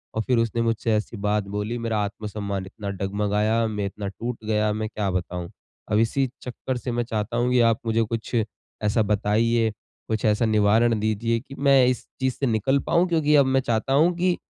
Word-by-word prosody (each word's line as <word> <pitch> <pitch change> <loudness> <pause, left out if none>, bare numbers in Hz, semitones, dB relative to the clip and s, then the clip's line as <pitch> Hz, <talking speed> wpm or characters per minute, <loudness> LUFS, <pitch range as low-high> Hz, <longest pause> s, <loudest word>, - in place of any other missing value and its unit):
और 110 - +1
फिर 125 0 +1
उसने 115 0 0
मुझसे 115 -1 0
ऐसी 105 +1 -2
बात 105 0 +1
बोली 105 +4 -2
मेरा 115 -2 -1
आत्मसम्मान 100 -2 -4
इतना 100 +1 -7
डगमगाया, 105 +3 0
मैं 105 -2 -2
इतना 100 +1 -5
टूट 115 +3 -5
गया, 105 -1 +1
मैं 110 0 -3
क्या 105 -2 -2
बताऊँ? 90 -1 -3 0.4
अब 105 - +3
इसी 130 +4 +2
चक्कर 125 +1 -4
से 125 - -4
मैं 120 0 0
चाहता 115 0 -3
हूँ 125 +1 +1
कि 125 - +4
आप 110 - -2
मुझे 115 0 +2
कुछ 115 +2 -4 0.5
ऐसा 105 +2 +2
बताइए, 110 +2 +1 0.4
कुछ 110 -1 -1
ऐसा 105 +2 +3
निवारण 110 +1 +3
दीजिए 110 +2 0
कि 135 +3 -12
मैं 135 -2 +5
इस 125 - 0 0.2
चीज़ 130 -1 +1
से 140 - -1
निकल 120 +5 +2
पाऊँ 175 +2 +3
क्योंकि 150 -3 +3
अब 140 -2 +6
मैं 130 0 +2
चाहता 120 +1 0
हूँ 165 +5 +4
कि 180 0 +1
110 Hz, 200 wpm, -24 LUFS, 105-125 Hz, 0.5 s, अब